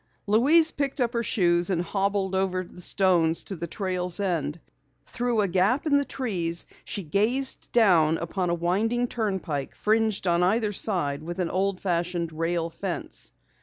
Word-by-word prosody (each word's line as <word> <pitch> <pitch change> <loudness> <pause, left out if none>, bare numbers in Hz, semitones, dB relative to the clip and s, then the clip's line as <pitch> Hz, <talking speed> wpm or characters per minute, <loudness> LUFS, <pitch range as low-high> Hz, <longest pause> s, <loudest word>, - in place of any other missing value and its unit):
Louise 290 +10 +5
picked 280 0 -3
up 245 -1 0
her 235 - 0
shoes 175 -5 +2
and 175 -2 0
hobbled 195 +1 -1
over 190 -1 0
the 180 0 -10
stones 175 -4 +2
to 195 - -5
the 170 0 -5
trail's 180 -1 -2
end. 170 -5 -1 0.5
Through 240 -2 -1
a 200 - +1
gap 195 - +1
in 295 -2 +3
the 285 - 0
trees 175 -12 -1 0.2
she 200 - -4
gazed 220 - 0
down 170 -9 +4
upon 175 +2 -2
a 170 - +1
winding 210 +8 0
turnpike 190 - -3
fringed 220 -2 +1
on 175 -1 +2
either 210 +3 +1
side 155 -9 0
with 170 +2 -6
an 180 -3 -1
old 190 0 0
fashioned 175 -2 -1
rail 165 +1 -1
fence. - - -5
190 Hz, 165 wpm, -26 LUFS, 170-220 Hz, 0.5 s, Louise